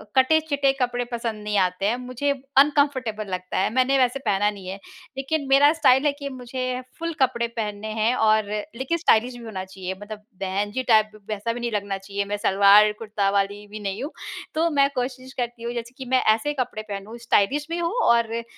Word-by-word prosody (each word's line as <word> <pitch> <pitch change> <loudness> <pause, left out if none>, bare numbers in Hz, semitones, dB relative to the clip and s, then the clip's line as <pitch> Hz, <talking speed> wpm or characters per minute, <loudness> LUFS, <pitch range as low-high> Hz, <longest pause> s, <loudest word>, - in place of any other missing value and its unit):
कटे-चिटे 285 0 +3
कपड़े 245 0 0
पसंद 230 -3 -3
नहीं 210 0 -1
आते 180 +2 -3
हैं। 215 +4 +2
मुझे 255 +3 -1 0.3
अनकम्फ़र्टेबल 270 -7 +3
लगता 185 0 -4
है। 190 - +2
मैंने 260 +2 +3
वैसे 255 0 +2
पहना 205 +1 +2
नहीं 195 -3 -10
है, 190 +2 -5 0.4
लेकिन 280 +1 -2
मेरा 280 +2 +6
स्टाइल 280 -3 +4
है 295 - +4
कि 280 -1 -4
मुझे 255 0 -4 0.2
फ़ुल 335 0 -3
कपड़े 235 -2 +2
पहनने 210 -1 -3
हैं 225 +3 +3 0.2
और 215 -1 +2 0.3
लेकिन 265 +7 -1
स्टाइलिश 245 -6 +2
भी 240 - -11
होना 195 -4 -5
चाहिए। 190 -1 -6
मतलब 210 0 -8 0.2
बहन 195 +2 -2
जी 260 +4 -2
टाइप 215 -1 +5 0.2
वैसा 215 +2 -2
भी 240 - -6
नहीं 240 -1 -2
लगना 200 -2 -2
चाहिए। 200 +1 -4
मैं 205 +1 -3
सलवार, 200 +1 +6
कुर्ता 210 -3 -1
वाली 200 +1 -1
भी 210 +1 -8
नहीं 200 +3 -4
हूँ। 295 - -5 0.4
तो 330 +2 +2
मैं 275 0 +5
कोशिश 255 +1 -4
करती 240 -1 -5
हूँ। 235 +1 -3
जैसे 235 0 -6
कि 265 - -7
मैं 255 - +5
ऐसे 295 +7 -3
कपड़े 240 -3 -2
पहनूँ, 200 +3 -6
स्टाइलिश 240 +5 +1
भी 335 - -2
हो 340 0 -1 0.2
और 235 -1 +1
अ, 235 0 -2
235 Hz, 205 wpm, -24 LUFS, 205-265 Hz, 0.4 s, मेरा